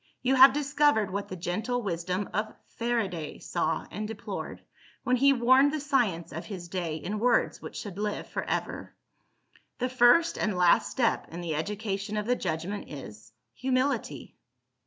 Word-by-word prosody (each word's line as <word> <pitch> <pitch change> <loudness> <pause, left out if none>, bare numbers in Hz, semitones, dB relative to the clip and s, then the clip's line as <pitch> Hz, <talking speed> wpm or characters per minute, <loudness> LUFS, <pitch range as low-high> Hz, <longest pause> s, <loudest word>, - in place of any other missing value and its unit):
You 260 +1 +3
have 265 +1 +9
discovered 285 -7 +2
what 200 +1 -3
the 185 - -6
gentle 215 +8 -2
wisdom 180 +1 -2
of 215 +1 -2 0.2
FARADAY 210 -10 -2
saw 165 -2 -2
and 210 0 -4
deplored, 220 -1 -6 0.4
when 250 - +2
he 275 +3 +5
warned 260 +2 +5
the 310 - -2
science 240 - 0
of 165 - -6
his 185 -5 -7
day 170 -3 -3
in 185 +7 -4
words 245 +2 +2
which - - -8
should 200 -2 -6
live 210 0 -2
for - - -3
ever: - - -3 0.8
"The 250 +1 -1
first 255 +7 +4
and 210 -3 0
last 180 -1 +4
step 240 -4 0
in 170 +2 -6
the 170 -2 -3
education 205 +4 -3
of 210 - -1
the 245 +2 +2
judgment 185 +2 -4
is 110 -7 -10 0.2
Humility." 260 +2 -1
210 Hz, 160 wpm, -28 LUFS, 175-250 Hz, 0.8 s, have